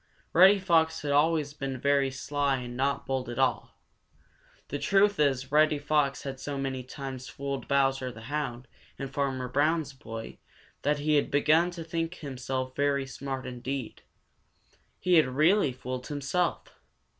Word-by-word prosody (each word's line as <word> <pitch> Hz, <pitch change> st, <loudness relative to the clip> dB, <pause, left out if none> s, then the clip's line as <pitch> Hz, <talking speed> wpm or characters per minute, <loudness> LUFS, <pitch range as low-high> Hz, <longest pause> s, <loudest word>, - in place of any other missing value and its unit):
Reddy 190 Hz, +4 st, +8 dB
Fox 165 Hz, -5 st, +2 dB
had 145 Hz, -, -1 dB
always 150 Hz, 0 st, +2 dB
been 135 Hz, -3 st, -4 dB
very 140 Hz, 0 st, +2 dB
sly 140 Hz, +1 st, -1 dB
and 120 Hz, -1 st, -6 dB
not 140 Hz, +2 st, 0 dB
bold 130 Hz, -2 st, -2 dB
at 120 Hz, -, -6 dB
all. 130 Hz, 0 st, 0 dB, 0.9 s
The 145 Hz, -, -3 dB
truth 200 Hz, +2 st, +3 dB
is 135 Hz, -3 st, +1 dB
Reddy 155 Hz, 0 st, +4 dB
Fox 145 Hz, -1 st, 0 dB
had 135 Hz, -1 st, -5 dB
so 145 Hz, 0 st, -4 dB
many 135 Hz, -1 st, -2 dB
times 130 Hz, 0 st, -7 dB
fooled 140 Hz, 0 st, -5 dB
Bowser 135 Hz, -2 st, +1 dB
the 110 Hz, -, -11 dB
Hound 130 Hz, -1 st, -4 dB, 0.3 s
and 135 Hz, 0 st, -6 dB
Farmer 135 Hz, -3 st, -1 dB
Brown's 145 Hz, +3 st, +1 dB
boy 115 Hz, -4 st, -8 dB, 0.4 s
that 150 Hz, +1 st, +1 dB
he 150 Hz, +1 st, +2 dB
had 145 Hz, -, +1 dB
begun 155 Hz, +4 st, +3 dB
to 165 Hz, -, -4 dB
think 165 Hz, +1 st, -3 dB
himself 130 Hz, -3 st, -4 dB
very 140 Hz, -1 st, +1 dB
smart 135 Hz, 0 st, -5 dB
indeed. 125 Hz, 0 st, -5 dB, 1.0 s
He 180 Hz, -1 st, +4 dB
had 155 Hz, -, +5 dB
really 155 Hz, +5 st, +3 dB
fooled 130 Hz, 0 st, -6 dB
himself. 150 Hz, +5 st, -2 dB
140 Hz, 155 wpm, -28 LUFS, 130-150 Hz, 1.0 s, Reddy